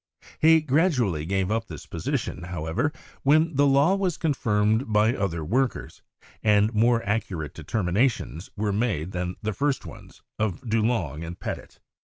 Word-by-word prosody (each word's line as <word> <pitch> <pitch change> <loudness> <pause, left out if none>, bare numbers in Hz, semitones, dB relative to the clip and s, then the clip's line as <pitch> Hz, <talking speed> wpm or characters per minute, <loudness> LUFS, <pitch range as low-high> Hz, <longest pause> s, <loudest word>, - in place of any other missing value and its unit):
He 160 0 +6
gradually 130 - +1
gave 95 +1 0
up 115 +1 -1
this 80 -4 -9
position, 85 - -3
however, 85 - -2 0.3
when 155 +3 +3
the 140 +1 +4
law 140 +6 +4
was 190 -4 0
confirmed 110 -6 +1
by 105 +2 +4
other 85 - -2
workers, 125 - -1 0.4
and 105 +1 +3
more 115 +2 +3
accurate 95 -8 -2
determinations 100 - -1
were 105 -1 0
made 100 -6 -1
than 90 0 -3
the 110 0 -1
first 140 +4 -1
ones - - -12 0.2
of 105 -5 -1
Dulong 110 - 0
and 85 +2 -7
Petit. - - -6
110 Hz, 145 wpm, -25 LUFS, 90-135 Hz, 0.4 s, He